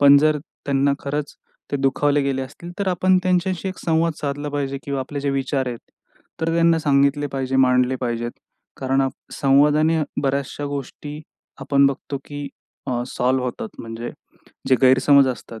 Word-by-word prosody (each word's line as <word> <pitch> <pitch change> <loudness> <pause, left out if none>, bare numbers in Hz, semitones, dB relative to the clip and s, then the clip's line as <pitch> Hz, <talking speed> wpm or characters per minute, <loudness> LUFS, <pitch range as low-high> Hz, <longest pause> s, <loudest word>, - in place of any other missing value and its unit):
पण 140 0 +8
जर 155 0 +3 0.3
त्यांना 140 0 +2
खरंच 145 +1 -4 0.4
ते - - 0
दुखावले 140 +1 +2
गेले 135 -1 -1
असतील, 170 +6 -9
तर 200 - 0
आपण 185 +1 +3
त्यांच्याशी 185 +1 0
एक 185 - -6
संवाद 165 0 +2
साधला 145 0 -3
पाहिजे 140 -1 -2
किंवा 140 -1 -3
आपले 140 +2 -5
जे 140 0 0
विचार 135 0 -1
आहेत, 120 -1 -5 0.6
तर 165 0 0
त्यांना 165 -1 +4
सांगितले 140 -1 +2
पाहिजे, 135 -1 -1
मांडले 125 0 +3
पाहिजेत. 120 -1 -2 0.5
कारण 135 +1 0
आ, 135 - +2 0.2
संवादाने 150 +3 +3 0.2
बऱ्याचशा 140 +1 -1
गोष्टी 145 +2 -6 0.4
आपण 140 -1 +3
बघतो 140 0 -3
की 145 -1 -6 0.6
सॉल्व्ह 125 +1 0
होतात. 215 - -4
म्हणजे 115 +1 -6 0.6
जे 130 - +5
गैरसमज 135 +2 +6
असतात, 115 -2 -6
140 Hz, 155 wpm, -22 LUFS, 135-150 Hz, 0.6 s, पण